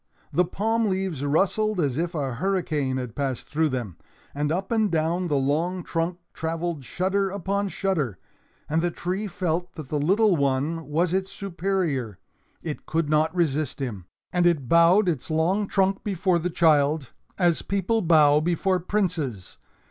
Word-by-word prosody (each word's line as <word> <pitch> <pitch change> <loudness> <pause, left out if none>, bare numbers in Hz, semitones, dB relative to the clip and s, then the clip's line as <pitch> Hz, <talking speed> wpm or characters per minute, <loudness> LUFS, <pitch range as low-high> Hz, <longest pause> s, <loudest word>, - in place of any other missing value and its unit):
The 180 - +3
palm 220 +5 0
leaves 185 -7 -2
rustled 195 +7 +1
as 140 -6 +1
if 170 +3 -2
a 135 -4 -2
hurricane 150 -4 -1
had 125 -4 -5
passed 135 -3 -3
through 155 +1 +1
them, 120 - -4 0.4
and 145 +1 -1
up 190 +5 -2
and 220 -2 +2
down 170 +3 0
the 145 -3 +1
long 165 +7 0
trunk 170 +2 -2 0.2
traveled 165 -2 -3
shudder 190 +7 0
upon 200 +1 -1
shudder. 155 - -1 0.5
And 160 +2 +1
the 175 - +1
tree 185 +5 -3
felt 175 -1 -2
that 155 -5 -8
the 150 - -1
little 195 +6 +3
one 145 +3 0
was 165 +4 +1
its 190 +1 -1
superior. 170 - -2 0.5
It 155 -3 -6
could 160 -2 0
not 155 +3 +2
resist 155 -5 0
him. 110 -10 -4 0.3
And 175 -1 +3
it 150 -7 +1
bowed 170 - +5
its 160 -5 -1
long 175 +6 +1
trunk 195 0 +1
before 185 -3 +1
the 175 +2 -2
child, 150 -4 +2 0.3
as 175 -3 +2
people 200 +3 0
bow 150 -4 +5
before 175 +3 +1
princes. 165 - -2
170 Hz, 160 wpm, -25 LUFS, 145-190 Hz, 0.5 s, bowed